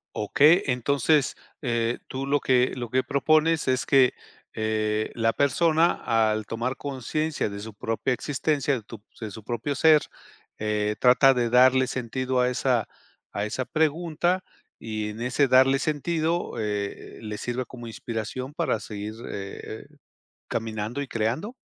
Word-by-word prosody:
Okey, 150 - +4
entonces, 140 +3 +2 0.3
eh, 120 -3 0
tú 135 +1 -4
lo 140 +1 +2
que 125 -1 +2
lo 120 -3 -5
que 130 +2 +1
propones 155 +3 +2
es 130 0 +1
que, 135 -2 +4 0.4
eh, 110 0 -1
la 115 -1 +1
persona 160 +4 +3 0.4
al 110 -1 -2
tomar 120 +3 -2
conciencia 145 +3 -2
de 100 0 -7
su 110 0 -8
propia 115 +5 -1
existencia, 145 +2 -1
de 120 - -5
tu 110 0 -11 0.2
de 110 - -4
su 110 +2 -10
propio 120 +6 -3
ser, 155 0 +6 0.6
eh, 105 0 -1
trata 135 +2 +6
de 120 -1 +1
darle 130 +1 +6
sentido 130 +1 -2
a 125 0 +3
esa 125 -2 0 0.4
a 100 +1 -2
esa 125 +4 -3
pregunta 165 +3 0 0.4
y 110 -1 -4
en 110 +2 -8
ese 125 +3 +2
darle 130 +1 +5
sentido, 160 +3 -1
eh, 105 -2 -4
le 105 -1 -5
sirve 125 +1 -3
como 120 -2 -10
inspiración 115 +4 -5
para 115 - 0
seguir, 105 0 -6 0.2
eh 100 -1 -6 0.2
eh, - - -24 0.6
¿caminando 110 +3 -3
y 140 - -4
creando? 120 - -2
125 Hz, 150 wpm, -25 LUFS, 110-145 Hz, 0.6 s, ser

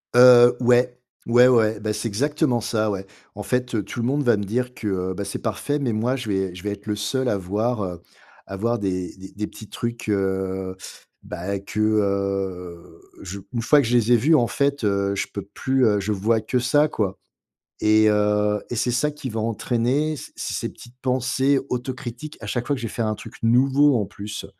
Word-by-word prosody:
Heu, 125 -1 +8
ouais. 125 +1 +3 0.3
Ouais, 120 +1 +6
ouais. 110 -4 +3
Bah, 105 0 -2
c'est 105 +2 -3
exactement 130 +2 0
ça, 110 0 0
ouais. 95 -1 -3 0.3
En 105 - -6
fait, 125 +3 -1
heu, 105 - 0
tout 120 - -7
le 115 - 0
monde 145 +2 +1
va 120 -3 +4
me 100 - -2
dire 125 +5 -2
que, 110 - -6 0.2
heu, - - -3
bah, 100 +2 -5
c'est - - -4
parfait 145 0 -2
mais 130 -6 -1
moi 120 +5 0
je 125 -5 -5
vais 95 -2 -1
je 90 - -10
vais 105 - -2
être 100 +1 -8
le 105 - 0
seul 125 +5 -1
à 100 - +1
voir, 105 +4 -1
heu, 90 -2 -5 0.5
à 100 - -6
voir 115 +3 0
des 90 -2 -3
des 95 0 -11
des 105 +1 -3
petits 110 - -12
trucs, 120 -2 -4
heu, 95 -1 -1 0.5
bah, 95 +3 -4
que, 100 +2 -6
heu, 100 -4 -1 0.2
je 100 +1 -7
une 120 - -1
fois 145 +5 +5
que - - -2
je 120 - +1
les 120 +1 +2
ai 120 - +6
vus 155 +8 +3
en 120 -5 +3
fait, 140 -1 0
heu, 100 -1 +1
je - - -2
peux 100 - -5
plus, 130 +6 0
heu 105 -2 +3
je 105 +2 -2
vois 110 +3 +1
que 110 +4 -1
ça 145 +5 +3
quoi 100 -9 -2 0.6
et 110 0 +5
heu 105 0 +2
et 120 - -3
c'est 125 +2 +1
ça 140 +5 +1
qui 145 -3 -7
va 110 0 -3
entraîner 120 +7 0
c - - -10
c - - -4
ces - - -2
petites 120 - -15
pensées 130 +2 +1
autocritiques 125 +3 -5
à 105 - -7
chaque 120 +3 -2
fois 145 - +1
que - - -7
je 115 - -2
vais - - -7
faire 115 -2 -1
un 110 - 0
truc - - -11
nouveau 135 +4 +4
en 100 - -2
plus. 105 +1 -7
110 Hz, 225 wpm, -23 LUFS, 100-125 Hz, 0.6 s, Heu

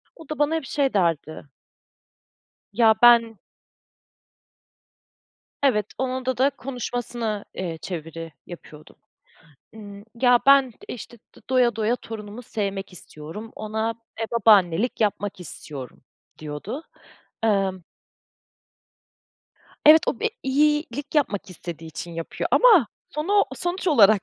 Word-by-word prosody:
O 325 -3 -15
da 305 -2 -5
bana 295 +2 +2
hep 320 -4 -3
şey 275 -1 0
derdi. 165 -5 0 1.3
Ya 220 +1 +5
ben 230 -2 +6 2.2
Evet, 210 -7 +2
onunda 260 -1 -2
da 270 +2 +4
konuşmasını, 245 -5 -4 0.2
ııı, 170 -3 -4
çeviri 165 -1 -7
yapıyordum. 155 -3 -12 0.8
Iıı, 205 -2 -11 0.2
ya 245 -1 +6
ben 275 -2 +6 0.2
işte 240 0 -8 0.2
d - - -16
doya 245 -3 +3
doya 225 +2 +1
torunumu 220 0 -9
sevmek 200 -4 -4
istiyorum, 180 +6 -10
ona, 220 +1 -2 0.2
eee, 225 - -2
babaannelik 210 -1 +3
yapmak 205 -2 -1
istiyorum 140 -7 -9 0.3
diyordu. 155 - -6 0.6
Iıı 195 -4 +1 2.0
Evet, 310 +2 +9
o - - -2
bir 450 - +1
iyilik 290 0 0
yapmak 220 -11 0
istediği 165 -2 -8
için 170 +2 -7
yapıyor 165 -1 -4
ama 430 - +6 0.2
sonu 390 +8 +2
sonuç 355 +2 -3
olarak 215 - +6
225 Hz, 110 wpm, -24 LUFS, 190-265 Hz, 2.2 s, Evet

